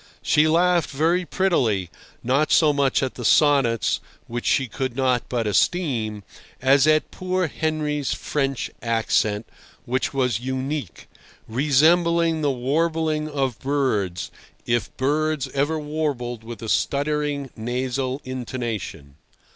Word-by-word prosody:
She 150 +1 +4
laughed 175 +1 +3
very 165 +6 +1
prettily, 115 - +1 0.3
not 135 +5 +1
so 155 -3 +5
much 140 -1 +2
at 130 - -2
the 120 - -8
sonnets, 135 -3 +3 0.3
which 120 +1 -4
she 135 - +2
could 130 +2 -4
not 130 -2 0
but 120 -3 -1
esteem, 110 - 0 0.4
as 135 +2 +4
at 155 0 +3
poor 185 0 -1
Henry's 150 -2 -2
French 135 -3 -2
accent, 110 -2 0 0.4
which 130 +2 -1
was 125 -5 0
unique, 130 - -4 0.4
resembling 160 +6 +3
the 145 - +2
warbling 155 +4 0
of 135 -6 -2
birds, 105 -11 -1 0.3
if 120 -3 0
birds 150 +1 0
ever 145 +4 0
warbled 145 -6 -3
with 115 0 -8
a - - -5
stuttering, 145 0 0
nasal 130 +3 -2
intonation. 115 - -5
135 Hz, 120 wpm, -23 LUFS, 120-155 Hz, 0.4 s, so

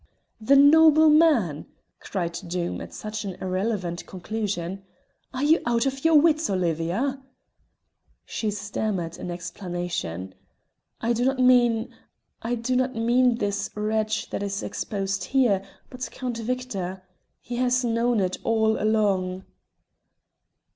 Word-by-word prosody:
"The 270 +6 +4
noble 310 +2 +7
man!" 285 - +3 0.3
cried 175 -4 -3
Doom 175 0 -3
at - - -8
such 215 +1 -5
an 195 -3 -5
irrelevant 185 -2 -2
conclusion. 195 -1 -4 0.5
"Are 260 +1 -3
you 315 +3 +4
out 235 +1 +1
of 270 0 -2
your 325 0 +4
wits, 315 0 +2
Olivia?" 185 - -1 1.0
She 220 - -3
stammered 200 -4 -3
an - - -6
explanation. 175 - -5 0.7
"I 235 +1 +1
do 235 +1 0
not 265 +1 +1
mean 245 -3 +3 0.5
I 235 +2 -1
do 240 +2 -2
not 255 +1 0
mean 240 +2 +3
this 205 -3 -2
wretch 215 +1 -1
that - - -3
is 200 0 -3
exposed 195 -2 -3
here, 245 -8 +2 0.3
but 255 -1 -5
Count 250 -2 -5
Victor. 220 -7 -4 0.4
He 240 -1 -6
has 250 0 +1
known 235 0 +1
it 185 -1 -1
all 220 -1 +2
along." 195 -4 +1
220 Hz, 125 wpm, -25 LUFS, 185-250 Hz, 1.0 s, noble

